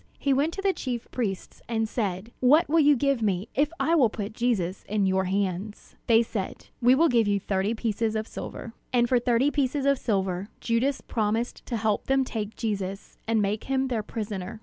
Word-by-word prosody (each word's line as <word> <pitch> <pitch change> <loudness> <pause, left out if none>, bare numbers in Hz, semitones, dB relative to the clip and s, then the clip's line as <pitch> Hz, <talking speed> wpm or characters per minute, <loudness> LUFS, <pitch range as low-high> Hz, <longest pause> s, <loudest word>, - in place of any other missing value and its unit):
He 275 - +1
went 285 +5 +2
to 390 - -5
the 390 -1 +3
chief 245 -6 -4
priests, 200 -7 -4
and 225 -1 0
said: 210 -1 -3
"What 300 +7 +5
will 325 +3 +3
you 295 -1 +6
give 275 -1 +1
me, 200 -1 0
if 290 +3 +1
I 330 - +2
will 270 -9 +5
put 210 -1 -5
Jesus 210 -7 -1
in 205 -1 +1
your 190 0 +2
hands?" 195 +2 -3
They 230 0 +5
said, 210 -4 -5
"We 245 +2 +6
will 330 +5 +4
give 235 -6 +3
you 200 -1 +2
thirty 195 +3 -1
pieces 220 0 -1
of 220 0 -2
silver." 230 - -7 0.2
And 240 -1 +3
for 250 0 +3
thirty 245 +4 +2
pieces 280 -1 0
of 280 -1 +3
silver 190 -3 -1
Judas 245 +4 0
promised 225 +2 -2
to 235 - -2
help 215 -1 0
them 270 0 +3
take 220 -3 -4
Jesus, 195 -3 -4
and 225 -2 +2
make 205 +2 -2
him 265 0 0
their 235 -4 0
prisoner. 210 -2 -5
225 Hz, 200 wpm, -26 LUFS, 205-260 Hz, 0.2 s, you